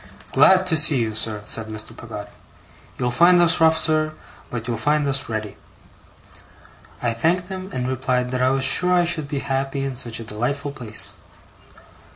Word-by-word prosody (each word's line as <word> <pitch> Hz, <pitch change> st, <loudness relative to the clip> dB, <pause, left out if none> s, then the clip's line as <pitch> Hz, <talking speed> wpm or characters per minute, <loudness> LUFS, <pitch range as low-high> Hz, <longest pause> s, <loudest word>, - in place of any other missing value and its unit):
'Glad 185 Hz, +7 st, +5 dB
to 175 Hz, -3 st, +1 dB
see 155 Hz, -2 st, +4 dB
you, 115 Hz, -3 st, 0 dB
sir,' 110 Hz, -1 st, -1 dB
said 110 Hz, +1 st, -2 dB
Mr. 110 Hz, -1 st, -7 dB
Peggotty. -, -, -9 dB, 0.7 s
'You'll 125 Hz, 0 st, -1 dB
find 175 Hz, +7 st, +5 dB
us 170 Hz, -1 st, +3 dB
rough, 160 Hz, 0 st, +5 dB
sir, 155 Hz, -1 st, +2 dB, 0.4 s
but 120 Hz, -1 st, -5 dB
you'll 120 Hz, -, -1 dB
find 150 Hz, +5 st, +1 dB
us 135 Hz, -2 st, -1 dB
ready.' 110 Hz, -2 st, -4 dB, 1.5 s
I 120 Hz, -1 st, +1 dB
thanked 175 Hz, +10 st, 0 dB
him, 190 Hz, 0 st, -6 dB
and 125 Hz, -6 st, -3 dB
replied 130 Hz, -1 st, -1 dB
that 130 Hz, 0 st, -1 dB
I 130 Hz, -, +3 dB
was 135 Hz, 0 st, 0 dB
sure 180 Hz, +6 st, +4 dB
I 175 Hz, -1 st, +3 dB
should 165 Hz, -4 st, +1 dB
be 140 Hz, -1 st, -3 dB
happy 135 Hz, 0 st, -2 dB
in 135 Hz, -1 st, -4 dB
such 120 Hz, -3 st, -4 dB
a -, -, -6 dB
delightful 120 Hz, +7 st, -3 dB
place. 115 Hz, -6 st, -6 dB
135 Hz, 180 wpm, -22 LUFS, 120-160 Hz, 1.5 s, Glad